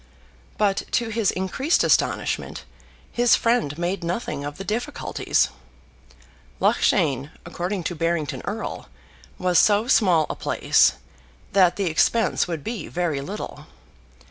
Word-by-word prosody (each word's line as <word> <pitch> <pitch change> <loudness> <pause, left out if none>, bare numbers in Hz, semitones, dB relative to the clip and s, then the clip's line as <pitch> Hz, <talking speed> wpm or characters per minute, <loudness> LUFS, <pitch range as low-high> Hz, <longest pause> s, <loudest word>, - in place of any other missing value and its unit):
But 200 -2 +2 0.2
to 235 -2 +1
his 220 -2 +1
increased 190 - 0
astonishment, - - 0 0.5
his 240 -1 +4
friend 230 - 0
made 175 +2 -2
nothing 170 -4 -3
of 145 0 -6
the 195 - -6
difficulties. 240 +8 -1 1.1
Loughshane, 140 -7 +2 0.2
according 175 +2 -3
to 175 - -2
Barrington 165 -2 -2
Erle, - - -5 0.5
was 180 -1 +3
so 210 +2 +3
small 180 - +4
a - - -4
place, - - +3 0.6
that 185 -3 +4
the 200 - -1
expense 180 +8 +2
would 165 -5 -4
be 225 -8 -5
very 170 -6 -2
little. 200 +9 -7
185 Hz, 120 wpm, -23 LUFS, 165-215 Hz, 1.1 s, his